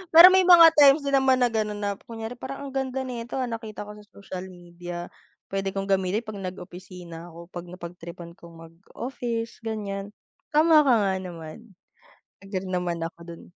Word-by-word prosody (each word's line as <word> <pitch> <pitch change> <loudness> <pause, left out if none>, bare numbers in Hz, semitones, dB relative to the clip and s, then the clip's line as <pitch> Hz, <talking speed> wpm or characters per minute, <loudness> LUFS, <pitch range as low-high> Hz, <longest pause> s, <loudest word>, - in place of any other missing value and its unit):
Pero 335 +2 +12
may 375 -1 +4
mga 335 -2 +9
times 285 +1 +7
din 280 - -2
naman 265 -1 +3
na 245 - +2
ganun 210 -2 -2
na, 200 -1 -2
kunyari 225 +1 -6
parang 275 +1 -6
ang - - -8
ganda 265 0 -2
nito 240 -1 -6
ah, 265 - 0
nakita 220 -2 -6
ko 210 - -10
sa 210 - -17
social 190 -2 -8
media, 175 -1 -9 0.4
pwede 195 0 -2
kong 195 0 -2
gamitin 190 +3 +1
'pag 215 -3 -8
nag-opisina 180 -2 -9
ako, 170 +2 -13
'pag 175 0 -8
napagtripan 170 -1 -9
kong 170 -1 -14
mag-office, 230 +7 -6
ganyan. 205 -3 -4 0.4
Tama 310 0 +6
ka 255 - +6
nga 195 - +1
naman, 180 +4 -10 0.7
agree 190 -1 -4
naman 180 -2 -2
ako 165 - -7
dun. 170 -1 -10
200 Hz, 170 wpm, -25 LUFS, 180-240 Hz, 0.7 s, Pero